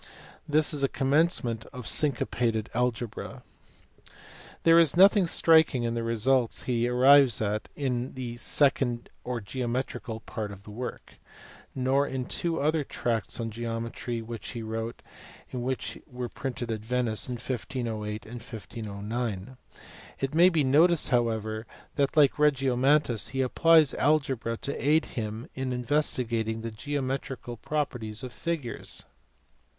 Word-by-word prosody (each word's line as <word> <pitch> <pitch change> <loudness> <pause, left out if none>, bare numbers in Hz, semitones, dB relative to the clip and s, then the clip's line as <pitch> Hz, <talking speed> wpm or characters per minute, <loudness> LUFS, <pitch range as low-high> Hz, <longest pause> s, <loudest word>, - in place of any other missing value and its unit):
This 155 +1 +3
is 145 - -1
a 135 - +3
commencement 135 -5 +1
of 125 -3 -8
syncopated 120 -6 0
algebra. 120 -1 -2 1.2
There 165 0 +7
is 165 -1 +4
nothing 195 0 +6
striking 160 -6 +4
in 115 0 -1
the 115 - -2
results 115 +2 +1
he 120 -1 0
arrives 130 -1 +6
at 105 0 -2
in 130 -3 -2
the 125 -2 -5
second 130 -2 +1
or 125 -1 -3
geometrical 120 +1 -4
part 105 -2 -5
of 100 -1 -11
the 105 - -11
work; 120 +4 -7 0.6
nor 135 +2 +2
in 130 -1 -3
two 170 +4 -1
other 155 +1 +1
tracts 115 -5 -2
on 115 -1 -3
geometry 115 +1 -4
which 115 0 -7
he 115 -2 -5
wrote 115 +1 -5 0.5
and 125 - -4
which 130 +1 -3
were 125 -1 -5
printed 125 -2 -4
at 110 - -2
Venice 120 -2 -1
in 125 - -3
1508 115 -3 -4
and 115 +2 -8
1509. 110 0 -5 0.6
It 135 +1 -2
may 175 +3 +7
be 160 -5 +2
noticed 160 +5 +4
however 110 -3 0 0.3
that 140 +1 0
like 145 -1 +5
Regiornontanus 135 -3 +3
he 135 - 0
applied 155 +3 +4
algebra 135 -6 +1
to 140 - -3
aid 155 +3 +3
him 110 +1 -4
in 130 -1 -3
investigating 120 -4 0
the 115 0 -5
geometrical 135 0 -4
properties 120 -6 -3
of 125 -2 -6
figures. 145 -3 -4
125 Hz, 135 wpm, -28 LUFS, 115-140 Hz, 1.2 s, There